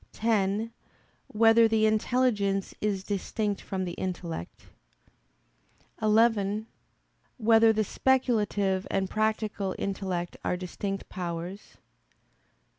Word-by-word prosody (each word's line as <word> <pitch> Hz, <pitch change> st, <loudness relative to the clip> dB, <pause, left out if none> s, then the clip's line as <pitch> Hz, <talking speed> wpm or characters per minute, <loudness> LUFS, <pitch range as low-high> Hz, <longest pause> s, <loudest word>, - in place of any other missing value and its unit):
(10) 215 Hz, 0 st, 0 dB, 0.6 s
Whether 225 Hz, +1 st, +5 dB
the 220 Hz, -1 st, +2 dB
intelligence 215 Hz, -3 st, +1 dB
is 200 Hz, -3 st, -1 dB
distinct 205 Hz, +1 st, -2 dB
from 190 Hz, -1 st, -3 dB
the 175 Hz, -, -4 dB
intellect? 175 Hz, -, -5 dB, 1.4 s
(11) 215 Hz, -1 st, +3 dB, 0.7 s
Whether 225 Hz, -1 st, +5 dB
the 215 Hz, 0 st, +1 dB
speculative 210 Hz, -6 st, +1 dB
and 190 Hz, -1 st, -1 dB
practical 215 Hz, -2 st, -1 dB
intellect 190 Hz, -3 st, -3 dB
are 180 Hz, -, 0 dB
distinct 195 Hz, +2 st, -5 dB
powers? 175 Hz, +2 st, -6 dB
205 Hz, 90 wpm, -28 LUFS, 190-220 Hz, 1.4 s, Whether